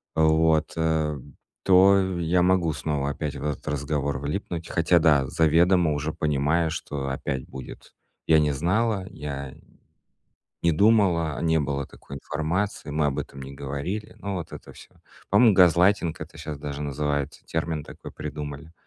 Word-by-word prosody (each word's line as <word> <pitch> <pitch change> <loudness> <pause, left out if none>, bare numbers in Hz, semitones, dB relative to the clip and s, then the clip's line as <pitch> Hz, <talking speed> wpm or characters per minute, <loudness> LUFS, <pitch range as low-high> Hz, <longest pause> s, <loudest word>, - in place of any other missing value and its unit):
вот, 80 0 +3
э, 80 -2 0 0.5
то 95 +1 +6 0.2
я 85 +2 +2
могу 90 -3 +2
снова 75 -2 -2
опять 75 0 -4
в 70 - -7
этот 75 -1 -4
разговор 70 -1 -2
влипнуть, 80 +3 -4
хотя 85 +1 +3
да, 75 -5 +4
заведомо 80 +2 +3
уже 75 +2 -3
понимая, 75 +3 +1
что 70 -4 -4
опять 65 -1 -3
будет: 65 -2 -10 0.3
"Я 80 -1 +6
не 75 -1 +2
знала, 95 +7 0
я 70 -2 -6 1.1
не 85 - +3
думала, 90 -5 +3
не 80 -1 +2
было 70 -1 -2
такой 70 - -11
информации, 80 +6 -3
мы 75 0 +1
об 70 0 -2
этом 70 -1 -6
не 65 +1 -8
говорили",- 70 +10 -5
ну, 100 -1 -4
вот 85 -3 -6
это - - -10
всё. - - -16 0.4
По-моему, 115 -4 +6
газлайтинг 90 -1 +4
это 80 +2 -9
щас 75 -2 -6
даже 75 0 -5
называется, 75 0 -3
термин 80 -1 -2
такой - - -11
придумали. 75 +2 -7
80 Hz, 150 wpm, -25 LUFS, 70-85 Hz, 1.1 s, то